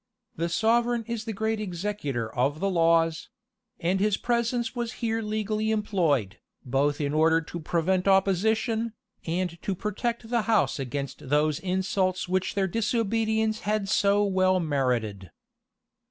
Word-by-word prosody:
The 170 +1 -1
sovereign 235 +5 +2
is 230 -1 -4
the 225 - -3
great 220 +1 -1
executor 175 - -3
of 140 +5 0
the 195 +2 0
laws; 165 -1 +2 0.5
and 180 +3 0
his 210 0 +2
presence 235 0 -1
was 240 -1 -3
here 225 -1 -2
legally 215 0 -1
employed, 170 - 0 0.3
both 140 +3 +1
in 145 -1 -1
order 160 +1 +4
to 165 +1 -7
prevent 175 +4 0
opposition, 220 +4 +2 0.3
and 170 0 -2
to 195 - -2
protect 225 +4 -3
the 235 -1 +2
house 215 -9 +2
against 135 0 -5
those 150 +1 +2
insults 185 0 -1
which 185 +2 -1
their 195 -1 +1
disobedience 220 +1 0
had 210 -1 -1
so 200 +1 +3
well 185 -2 +2
merited. 125 - -1
190 Hz, 140 wpm, -27 LUFS, 160-220 Hz, 0.5 s, order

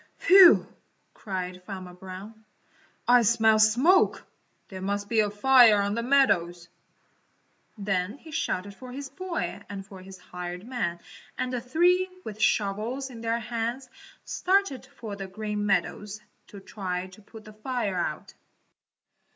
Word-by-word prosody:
"Phew!" 370 -1 +7 0.5
cried 185 -2 -5
Farmer 185 -2 -8
Brown, 190 +4 -10 0.6
"I 245 0 +6
smell 220 -1 +4
smoke! 255 - +4 0.4
There 190 -1 -8
must 200 +1 -2
be 225 0 +1
a 210 -1 +3
fire 230 0 +6
on 200 0 0
the 230 - -1
meadows." 180 -10 +2 1.1
Then 200 +2 -2
he 320 +2 -14
shouted 200 -10 -2
for 250 +5 -11
his 275 +1 -7
boy 360 - -4
and 195 -1 -7
for 195 -1 -12
his 190 0 -12
hired 180 +1 -8
man 195 -10 -3 0.4
and 255 0 -2
the 245 - -2
three, 355 +9 +2
with 215 -5 -8
shovels 220 +7 0
in 230 -2 -10
their 230 0 0
hands, 235 +3 -4 0.3
started 380 -7 0
for 215 -3 -8
the 195 -1 -7
Green 210 +1 -4
Meadows 205 +1 -1 0.3
to 200 - -11
try 185 -2 -5
to 185 +3 -15
put 220 +2 -14
the 215 - -12
fire 215 -2 -3
out. 155 -3 -4
215 Hz, 145 wpm, -26 LUFS, 195-250 Hz, 1.1 s, Phew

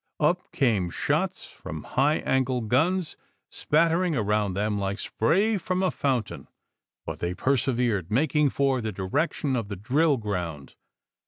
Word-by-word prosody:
Up 175 +4 +1
came 110 - +1
shots - - -1
from 80 -1 -8
high 145 +4 +2
angle 130 -1 0
guns, 160 - +1 0.3
spattering 165 +2 +2
around 105 -4 0
them 105 +1 0
like 100 0 -2
spray 195 - +1
from 185 +1 -1
a 185 - +2
fountain; 130 -6 -2 0.6
but - - -5
they 85 +1 -2
persevered, 120 -8 0
making 150 +5 +2
for 135 -2 +1
the 110 -1 -3
direction 130 - -1
of 115 -4 -2
the 100 - -5
drill 140 - +2
ground. 90 - -4
125 Hz, 140 wpm, -26 LUFS, 105-155 Hz, 0.6 s, high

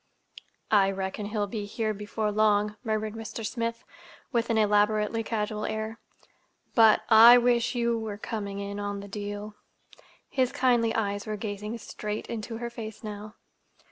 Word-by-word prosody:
"I 200 -2 +5
reckon 195 +1 -3
he'll 210 -1 -1
be 205 0 -4
here 215 +1 -2
before 210 +1 -3
long," 210 0 +2
murmured 215 -2 -1
Mr. 225 0 -6
Smith, 230 +1 -3 0.5
with 235 -2 0
an 225 - +2
elaborately 210 +1 +2
casual 215 -1 -2
air. 220 +1 -3 0.7
"But—I 225 +1 +8
wish 240 0 +2
you 235 -1 +1
were 215 -2 -5
coming 205 -2 -5
in 200 0 -5
on 205 -1 -3
the 200 - -9
deal." 205 +1 -6 0.7
His 255 -2 +1
kindly 240 -3 +2
eyes 205 -2 -1
were 215 -1 -3
gazing 210 +1 -4
straight 210 -1 -5
into 225 0 -4
her 235 0 -5
face 220 -2 -8
now. 210 0 -7
215 Hz, 145 wpm, -28 LUFS, 205-230 Hz, 0.7 s, But—I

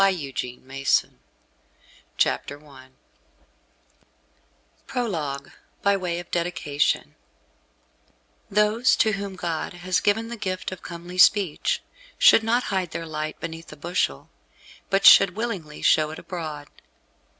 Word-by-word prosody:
THE 195 - +7 0.3
CHATELAINE 130 +2 -1
OF - - -33 0.4
VERGI 150 - -21
I 130 -2 -15 2.0
PROLOGUE 155 - -3 0.3
BY 200 0 +4
WAY 180 -3 -3
OF 175 - -11
DEDICATION 165 -4 -1 1.4
Those 210 +4 +3
to 220 - +2
whom 200 -1 -4
God 170 -3 -3
has 180 +1 -1
given 225 +2 0
the 235 - -6
gift 185 -3 -4
of 185 - -8
comely 175 +1 -8
speech, 190 -4 +3 0.3
should - - +7
not 235 +3 +1
hide 185 -3 0
their 165 - -5
light 155 -1 -5
beneath 165 0 -7
a 150 - -11
bushel, 155 - -2 0.6
but 195 0 +1
should 195 -2 +8
willingly 200 -10 -5
show 155 -1 +4
it 155 - -8
abroad. 155 -5 -6
175 Hz, 120 wpm, -24 LUFS, 155-200 Hz, 2.0 s, should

